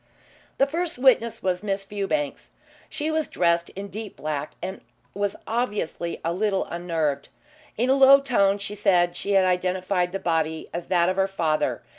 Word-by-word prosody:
The 275 - +4
first 330 +3 -3
witness 235 -3 +3
was 180 -1 0
Miss 195 -1 -2
Fewbanks. 205 +10 -3 0.4
She 305 +2 -2
was 315 -1 0
dressed 170 -1 +1
in 200 +1 -6
deep 215 0 -7
black 150 -1 -4
and 190 +2 -6 0.3
was 200 0 -1
obviously 210 -7 -2
a 165 - 0
little 195 +1 0
unnerved. 160 -5 -2 0.5
In 245 +4 +2
a - - +6
low 275 0 +8
tone 205 -8 +2
she 205 +1 -5
said 180 -4 +2
she 200 +3 -2
had 190 -1 +5
identified 180 0 0
the 195 - -2
body 160 -3 -1
as 170 0 -5
that 175 -2 +3
of 185 +1 0
her 195 0 +3
father. 165 -5 -1
195 Hz, 170 wpm, -25 LUFS, 175-220 Hz, 0.5 s, low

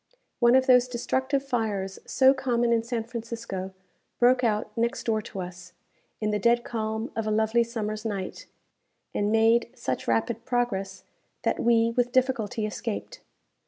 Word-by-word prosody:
One 240 0 +5
of 260 0 +4
those 250 -1 +5
destructive 260 +3 -1
fires 205 -6 -2
so 265 0 +5
common 240 -3 +1
in 230 - +3
San 230 0 -3
Francisco 230 -5 -5 0.5
broke 250 +1 +4
out 215 -2 0
next 235 +2 -1
door 220 -2 0
to 195 -2 -7
us, 180 0 -9 0.5
in 215 -1 0
the 210 - 0
dead 235 +3 +3
calm 220 +2 -3
of 225 -1 -2
a - - +1
lovely 220 +2 +2
summer's 215 -2 -4
night, 200 -4 -4 0.7
and 205 0 0
made 225 +1 +4
such 130 - -3
rapid 215 - 0
progress 195 -7 -2 0.4
that - - 0
we 230 -1 +3
with 245 +1 0
difficulty 250 -4 +1
escaped. 225 - -5
230 Hz, 155 wpm, -26 LUFS, 215-245 Hz, 0.7 s, One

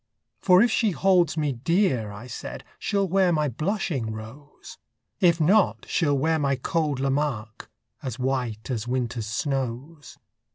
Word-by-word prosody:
For 185 +2 +5
if 240 - +2
she 225 - +2
holds 180 -3 +2
me 150 -2 +1
dear, 130 - +1
I 105 +4 -9
said, 125 - -7 0.2
She'll 200 -1 0
wear 185 0 +3
my 150 -2 +1
blushing 150 - -2
rose; 115 +7 -11 0.4
If 170 -2 +4
not, 190 +6 +3
she'll 145 -4 +1
wear 160 +3 +1
my 140 -2 +1
cold 150 +1 -1
Lamarque, 135 -6 -2 0.3
As 130 -3 -5
white 125 -3 -2
as 115 -2 -3
winter's 120 -3 -2
snows. 135 +5 -4
140 Hz, 140 wpm, -25 LUFS, 125-170 Hz, 0.4 s, For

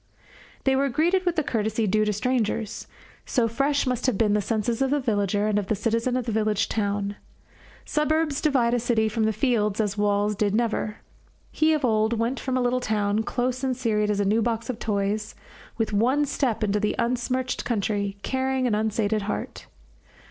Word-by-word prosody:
They 265 -1 +3
were 275 +1 +2
greeted 350 +8 +1
with 350 - +2
the 310 - +1
courtesy 220 -2 -1
due 215 +2 +2
to 210 - +1
strangers, 220 -1 -1 0.4
so 240 -4 +1
fresh 280 +5 +1
must 250 0 -1
have 255 - +1
been 215 -3 +2
the 210 - +2
senses 225 +3 -1
of 270 - +2
the 290 +2 +2
villager, 205 -4 0
and 210 -1 +2
of 200 - -5
the 215 - +1
citizen 230 +4 0
of 250 - -2
the 230 - -2
village 215 -1 +1
town. 205 -1 -2 0.7
Suburbs 305 -1 0
divide 255 -6 +2
a 245 - +2
city 230 -2 +1
from 220 +1 0
the 220 - +2
fields 215 -2 0
as 205 -1 -1
walls 205 0 +1
did 205 0 0
never. 220 -2 -1 0.5
He 315 0 +2
of 295 -3 +1
old 220 -1 +2
went 230 +3 -1
from 260 -1 -1
a - - +1
little 245 +1 +1
town, 210 -2 0
close 250 +3 -2
and 260 -2 0
serried 210 -4 0
as 205 -1 0
a 205 - +1
new 215 +3 +2
box 230 +2 -1
of 235 - -9
toys, 210 0 -2 0.4
with 225 -2 -1
one 255 +8 +3
step 260 -5 -1
into 210 0 +1
the 210 0 0
unsmirched 250 +2 -1
country, 205 -3 -1
carrying 265 0 0
an 240 - +1
unsated 215 0 0
heart. - - -5
225 Hz, 195 wpm, -25 LUFS, 210-255 Hz, 0.7 s, They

